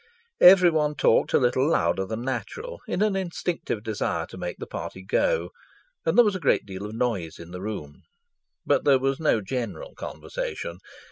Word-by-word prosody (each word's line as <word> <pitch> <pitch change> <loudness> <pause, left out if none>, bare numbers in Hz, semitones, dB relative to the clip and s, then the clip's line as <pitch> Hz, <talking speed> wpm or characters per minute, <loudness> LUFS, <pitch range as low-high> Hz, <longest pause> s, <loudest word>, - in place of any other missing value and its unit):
Everyone 170 -5 +6
talked 120 - +3
a - - +5
little 130 +3 +2
louder 95 -11 +1
than 110 +3 -4
natural 445 - -4
in 195 - 0
an 210 -2 +1
instinctive 175 - -3
desire 110 -3 -2
to - - -10
make 90 -1 -4
the - - -6
party 95 - -7
go, 485 - +1 0.6
and - - +2
there 240 - +8
was 205 -2 +1
a - - -3
great 145 - +2
deal 100 +1 -6
of 110 - -8
noise 110 -10 -2
in 85 +1 -11
the 90 0 -7
room. 95 -9 -6 0.6
But - - +2
there 140 -2 +5
was 135 +1 -1
no 150 -8 +2
general 130 - -4
conversation. - - -6
130 Hz, 180 wpm, -25 LUFS, -, 0.6 s, there